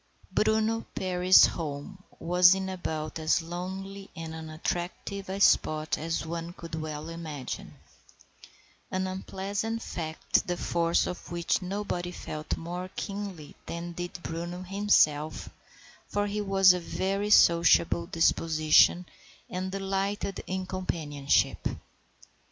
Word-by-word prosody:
* -, -, -29 dB
Bruno 220 Hz, +1 st, +1 dB
Perry's 185 Hz, 0 st, +6 dB
home 160 Hz, +4 st, -5 dB, 0.2 s
was 180 Hz, +2 st, +6 dB
in 190 Hz, 0 st, -3 dB
about 160 Hz, -4 st, -4 dB
as 160 Hz, +1 st, +2 dB
lonely 190 Hz, +3 st, -6 dB
and 160 Hz, -1 st, -6 dB
unattractive 175 Hz, +5 st, -4 dB
a 195 Hz, +1 st, -3 dB
spot 155 Hz, -5 st, +3 dB
as 165 Hz, +1 st, -3 dB
one 170 Hz, +1 st, -5 dB
could 170 Hz, -2 st, -11 dB
well 155 Hz, -1 st, -4 dB
imagine; 160 Hz, -5 st, -6 dB, 1.1 s
an 185 Hz, 0 st, -1 dB
unpleasant 195 Hz, +4 st, -3 dB
fact, 160 Hz, -2 st, -1 dB
the 175 Hz, -1 st, -1 dB
force 170 Hz, -1 st, +1 dB
of 180 Hz, -, -6 dB
which 170 Hz, +2 st, 0 dB
nobody 185 Hz, -2 st, -3 dB
felt 155 Hz, -3 st, -5 dB
more 175 Hz, +2 st, -5 dB
keenly 195 Hz, -7 st, -5 dB
than 170 Hz, +1 st, -5 dB
did 175 Hz, +1 st, -6 dB
Bruno 175 Hz, +2 st, -5 dB
himself, 180 Hz, -6 st, +2 dB, 0.6 s
for 205 Hz, 0 st, 0 dB
he 205 Hz, +1 st, -2 dB
was 195 Hz, -2 st, +6 dB
of 180 Hz, -, -3 dB
a -, -, -14 dB
very 195 Hz, +2 st, -1 dB
sociable 170 Hz, -2 st, +5 dB
disposition 165 Hz, 0 st, +4 dB, 0.5 s
and 185 Hz, +1 st, -3 dB
delighted 195 Hz, 0 st, -2 dB
in 185 Hz, 0 st, -2 dB
companionship. 155 Hz, -7 st, 0 dB
180 Hz, 120 wpm, -28 LUFS, 165-195 Hz, 1.1 s, Perry's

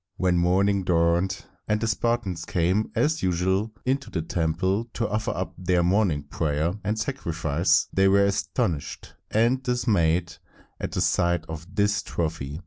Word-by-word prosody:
When 90 Hz, -1 st, +2 dB
morning 95 Hz, +3 st, +2 dB
dawned, 85 Hz, +2 st, +1 dB, 0.2 s
and 105 Hz, 0 st, +1 dB
the 115 Hz, -, -1 dB
Spartans 110 Hz, -5 st, -1 dB
came 90 Hz, +6 st, 0 dB
as 155 Hz, +2 st, +1 dB
usual 95 Hz, +4 st, 0 dB
into 135 Hz, +2 st, -1 dB
the 80 Hz, -, -3 dB
temple 90 Hz, +6 st, 0 dB
to 115 Hz, -, 0 dB
offer 105 Hz, +1 st, -2 dB
up 90 Hz, +2 st, -3 dB
their 90 Hz, -1 st, +1 dB
morning 90 Hz, -5 st, +2 dB
prayer 75 Hz, +3 st, -1 dB
and 105 Hz, +2 st, -1 dB
sacrifice, 85 Hz, -, 0 dB
they 95 Hz, 0 st, +4 dB
were 100 Hz, +1 st, +5 dB
astonished 85 Hz, -5 st, -2 dB, 0.2 s
and 120 Hz, +4 st, +2 dB
dismayed 90 Hz, -9 st, +1 dB, 0.4 s
at -, -, -4 dB
the -, -, -1 dB
sight 85 Hz, -2 st, +1 dB
of 80 Hz, +1 st, -7 dB
this 105 Hz, 0 st, +2 dB
trophy. 75 Hz, -3 st, -4 dB
90 Hz, 145 wpm, -25 LUFS, 85-105 Hz, 0.4 s, were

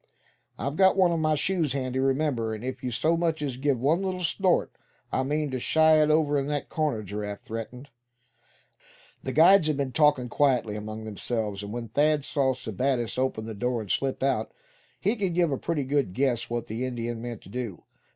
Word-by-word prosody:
"I've 140 Hz, +2 st, -3 dB
got 190 Hz, 0 st, +5 dB
one 185 Hz, -2 st, +5 dB
of 165 Hz, -, 0 dB
my 155 Hz, -1 st, +2 dB
shoes 160 Hz, -3 st, 0 dB
handy, 130 Hz, -1 st, -2 dB
remember, 135 Hz, -5 st, 0 dB
and 110 Hz, -, -9 dB
if 130 Hz, +1 st, -5 dB
you 125 Hz, -, -1 dB
so 155 Hz, +8 st, +1 dB
much 165 Hz, -2 st, 0 dB
as 135 Hz, -4 st, -3 dB
give 135 Hz, -2 st, +1 dB
one 155 Hz, +8 st, +2 dB
little 185 Hz, -1 st, -2 dB
snort 180 Hz, +2 st, +1 dB, 0.4 s
I -, -, +1 dB
mean 145 Hz, +2 st, -1 dB
to 130 Hz, -, -2 dB
shy 160 Hz, +3 st, +4 dB
it 150 Hz, -, +3 dB
over 150 Hz, -2 st, +3 dB
in 135 Hz, -, -3 dB
that 145 Hz, -1 st, -2 dB
corner," 150 Hz, -9 st, -1 dB
Giraffe 105 Hz, +1 st, -5 dB
threatened. 115 Hz, +4 st, -7 dB, 1.3 s
The 130 Hz, -, -4 dB
guides 170 Hz, +4 st, +6 dB
had 155 Hz, -2 st, 0 dB
been 140 Hz, -2 st, -1 dB
talking 145 Hz, -4 st, +3 dB
quietly 125 Hz, -5 st, +1 dB
among 110 Hz, +1 st, -6 dB
themselves, 110 Hz, -1 st, -3 dB
and 100 Hz, 0 st, -7 dB
when 115 Hz, 0 st, -5 dB
Thad 145 Hz, +4 st, +2 dB
saw 135 Hz, -2 st, +1 dB
Sebattis 125 Hz, +1 st, -2 dB
open 130 Hz, -4 st, -1 dB
the 110 Hz, -, -5 dB
door 120 Hz, +3 st, -1 dB
and 105 Hz, -, -5 dB
slip 135 Hz, -1 st, -1 dB
out, 135 Hz, 0 st, 0 dB, 0.5 s
he 210 Hz, -, +1 dB
could 195 Hz, -6 st, -1 dB
give 170 Hz, -3 st, +2 dB
a 135 Hz, -, 0 dB
pretty 165 Hz, -4 st, -1 dB
good 135 Hz, -7 st, 0 dB
guess 125 Hz, -1 st, 0 dB
what 120 Hz, -1 st, -2 dB
the 115 Hz, +3 st, -4 dB
Indian 120 Hz, -2 st, -3 dB
meant 120 Hz, -2 st, -6 dB
to -, -, -14 dB
do. 115 Hz, -5 st, -5 dB
135 Hz, 200 wpm, -27 LUFS, 120-155 Hz, 1.3 s, guides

